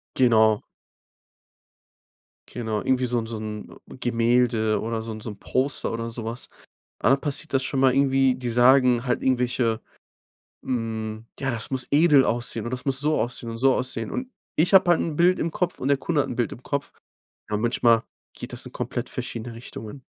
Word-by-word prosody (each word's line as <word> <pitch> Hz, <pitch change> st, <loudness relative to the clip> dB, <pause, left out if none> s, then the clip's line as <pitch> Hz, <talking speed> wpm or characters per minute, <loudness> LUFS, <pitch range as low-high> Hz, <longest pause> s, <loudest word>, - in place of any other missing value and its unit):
Genau. 110 Hz, -4 st, +4 dB, 1.9 s
Genau. 110 Hz, -3 st, -3 dB
Irgendwie 130 Hz, -1 st, +1 dB
so 120 Hz, 0 st, 0 dB
'n 115 Hz, -, -3 dB
so 115 Hz, 0 st, -5 dB
'n 105 Hz, -1 st, -7 dB, 0.2 s
Gemälde 115 Hz, -2 st, +2 dB
oder 115 Hz, 0 st, -3 dB
so 115 Hz, 0 st, -6 dB
'n 110 Hz, -, -7 dB
so 110 Hz, -, -6 dB
'n 105 Hz, -, -10 dB
Poster 135 Hz, +2 st, -1 dB
oder 115 Hz, 0 st, -3 dB
so 115 Hz, -1 st, -6 dB
was. 115 Hz, +2 st, -5 dB, 0.5 s
Dann 135 Hz, -, +3 dB
passiert 145 Hz, +1 st, -3 dB
das 135 Hz, -, +3 dB
schon 135 Hz, 0 st, -1 dB
mal 130 Hz, -1 st, +4 dB
irgendwie 135 Hz, -1 st, +3 dB
die 125 Hz, -1 st, -5 dB
sagen 125 Hz, 0 st, +5 dB
halt 125 Hz, -, 0 dB
irgendwelche, 125 Hz, -3 st, +1 dB, 0.8 s
hm: 110 Hz, -2 st, -3 dB
„Ja, 135 Hz, -1 st, -1 dB
das 115 Hz, 0 st, -4 dB
muss 130 Hz, -1 st, -2 dB
edel 145 Hz, -2 st, +6 dB
aussehen 120 Hz, -1 st, -1 dB
und 120 Hz, -, -4 dB
das 125 Hz, 0 st, -5 dB
muss 135 Hz, -1 st, 0 dB
so 150 Hz, +1 st, +1 dB
aussehen 120 Hz, 0 st, -3 dB
und 115 Hz, -, -5 dB
so 135 Hz, +2 st, +4 dB
aussehen." 125 Hz, -4 st, -3 dB
Und 255 Hz, -, -3 dB, 0.3 s
ich 170 Hz, +5 st, +2 dB
habe 185 Hz, -2 st, +7 dB
halt 175 Hz, -, +5 dB
'n 160 Hz, -, -2 dB
Bild 175 Hz, +3 st, +4 dB
im 165 Hz, -, -1 dB
Kopf 180 Hz, +1 st, -1 dB
und 130 Hz, -, -2 dB
der 140 Hz, -, +3 dB
Kunde 150 Hz, +2 st, 0 dB
hat 135 Hz, -, -3 dB
'n -, -, -4 dB
Bild 120 Hz, -1 st, 0 dB
im 125 Hz, -, -10 dB
Kopf. 140 Hz, -1 st, -3 dB, 0.6 s
Ja 105 Hz, -, 0 dB
manchmal 115 Hz, 0 st, +3 dB, 0.3 s
geht -, -, -8 dB
das -, -, -4 dB
in -, -, -9 dB
komplett -, -, -4 dB
verschiedene 115 Hz, 0 st, -5 dB
Richtungen. 115 Hz, +2 st, -9 dB
125 Hz, 195 wpm, -24 LUFS, 115-135 Hz, 1.9 s, habe